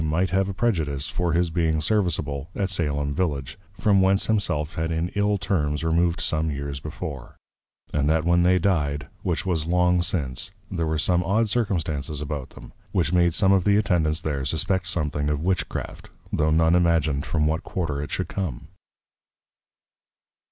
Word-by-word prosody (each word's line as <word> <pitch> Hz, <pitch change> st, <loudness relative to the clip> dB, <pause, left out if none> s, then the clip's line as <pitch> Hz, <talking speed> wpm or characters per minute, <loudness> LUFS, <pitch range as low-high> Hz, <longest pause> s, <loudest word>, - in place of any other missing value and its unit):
B._ 80 Hz, -, -1 dB
might 85 Hz, +3 st, +1 dB
have 95 Hz, +1 st, +1 dB
a -, -, -3 dB
prejudice 80 Hz, -, 0 dB
for 85 Hz, -2 st, -1 dB
his 85 Hz, 0 st, +1 dB
being 80 Hz, -2 st, +1 dB
serviceable 80 Hz, -5 st, -1 dB
at 95 Hz, -2 st, -1 dB
Salem 75 Hz, -5 st, -1 dB
Village, 70 Hz, -3 st, -2 dB, 0.2 s
from 100 Hz, -2 st, +4 dB
whence 95 Hz, +1 st, +3 dB
himself 85 Hz, -8 st, 0 dB
had 80 Hz, 0 st, -2 dB
in 80 Hz, +2 st, -1 dB
ill 105 Hz, +1 st, +1 dB
Terms 85 Hz, -6 st, -1 dB
removed 85 Hz, +1 st, +1 dB
some 80 Hz, 0 st, 0 dB
Years 70 Hz, -1 st, -4 dB
before: 70 Hz, -1 st, -7 dB, 0.6 s
And 75 Hz, 0 st, +1 dB
that 80 Hz, 0 st, +2 dB
when 85 Hz, 0 st, +4 dB
they 90 Hz, +1 st, +4 dB
dy'd, 75 Hz, -6 st, 0 dB, 0.2 s
which -, -, -1 dB
was 80 Hz, -4 st, 0 dB
long 90 Hz, 0 st, +3 dB
since, 70 Hz, -5 st, -2 dB, 0.2 s
there 85 Hz, -4 st, -1 dB
were 80 Hz, 0 st, 0 dB
some 90 Hz, +3 st, +2 dB
odd 105 Hz, +5 st, +1 dB
Circumstances 80 Hz, -, -1 dB
about 75 Hz, -3 st, -4 dB
them, -, -, -13 dB, 0.2 s
which 85 Hz, -4 st, 0 dB
made 85 Hz, -2 st, +3 dB
some 95 Hz, 0 st, +4 dB
of 95 Hz, -2 st, +4 dB
the 100 Hz, +1 st, +4 dB
Attendents 85 Hz, -6 st, +1 dB
there 70 Hz, -3 st, -2 dB
suspect 85 Hz, +6 st, 0 dB
something 75 Hz, -4 st, 0 dB
of 75 Hz, +1 st, -1 dB
Witch 95 Hz, 0 st, 0 dB
craft, -, -, -6 dB, 0.2 s
tho 75 Hz, 0 st, +2 dB
none 80 Hz, +1 st, +4 dB
Imagined 80 Hz, -5 st, +2 dB
from 75 Hz, -2 st, +1 dB
what 80 Hz, +1 st, 0 dB
Quarter 75 Hz, -6 st, -3 dB
it 75 Hz, -, -5 dB
should -, -, -2 dB
come. 85 Hz, -11 st, -4 dB
80 Hz, 175 wpm, -24 LUFS, 75-90 Hz, 0.6 s, from